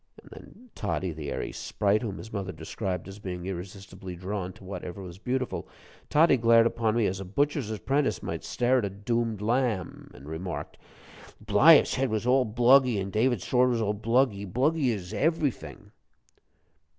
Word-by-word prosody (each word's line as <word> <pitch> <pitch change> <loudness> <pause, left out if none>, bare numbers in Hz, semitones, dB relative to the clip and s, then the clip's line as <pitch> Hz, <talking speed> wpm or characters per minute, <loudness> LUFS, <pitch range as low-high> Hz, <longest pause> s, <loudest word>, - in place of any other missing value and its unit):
And - - -18
then 245 +4 -14
Toddie 95 -3 -2
the 75 -2 -6
airy - - -3
sprite 105 0 0
whom 105 -5 -4
his 110 - -10
mother 95 -3 -3
described 90 +2 -5
as 95 +1 -10
being 90 -3 -6
irresistibly 95 0 -7
drawn 95 +1 -4
to - - -17
whatever 95 0 -7
was 90 0 -10
beautiful 130 +3 -3 0.4
Toddie 155 -2 +5
glared 115 0 +5
upon 115 -1 0
me 115 -2 +2
as 95 0 -1
a - - -5
butcher's 140 +5 -1
apprentice 135 +7 -1
might - - -4
stare 125 +1 +1
at 110 - -1
a - - -2
doomed 110 +2 -2
lamb, 115 -5 -1
and 70 +3 -13
remarked: 85 +3 -6 0.6
"Bliaff's 110 +10 +6
head 135 0 0
was 110 +1 -2
all 130 +1 +4
bluggy, 120 +1 +4
an' 95 0 -4
David's 115 -1 +1
sword 125 0 +3
was 120 -2 0
all 105 0 0
bluggy 110 -2 0
bluggy 135 - +2
as 95 -5 -5
everyfing." 155 -3 -2
110 Hz, 170 wpm, -27 LUFS, 95-125 Hz, 0.6 s, Bliaff's